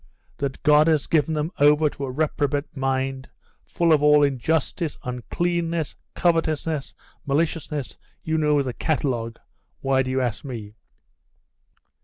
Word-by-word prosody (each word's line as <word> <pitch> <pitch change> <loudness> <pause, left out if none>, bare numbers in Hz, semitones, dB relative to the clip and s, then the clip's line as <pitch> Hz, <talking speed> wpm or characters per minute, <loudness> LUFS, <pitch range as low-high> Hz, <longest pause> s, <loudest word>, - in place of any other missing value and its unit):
That 140 -1 -4
God 150 -1 +5
has 155 -3 +2
given 160 0 +1
them 150 +2 -1
over 150 +2 +5
to 140 -1 -4
a - - -5
reprobate 145 0 -1
mind, 135 0 -2 0.3
full 170 -1 +2
of 150 - +3
all 150 0 +6
injustice, 150 +4 0
uncleanness, 165 +6 -2 0.2
covetousness, 160 -3 0 0.3
maliciousness, 150 -1 -1 0.2
you 160 0 0
know 150 -2 +3
the 130 -2 -4
catalogue 120 -6 -1 0.4
why 135 -1 +2
do 130 - -3
you 130 0 0
ask 120 -4 -2
me? 115 -7 -7
145 Hz, 130 wpm, -24 LUFS, 135-160 Hz, 0.4 s, all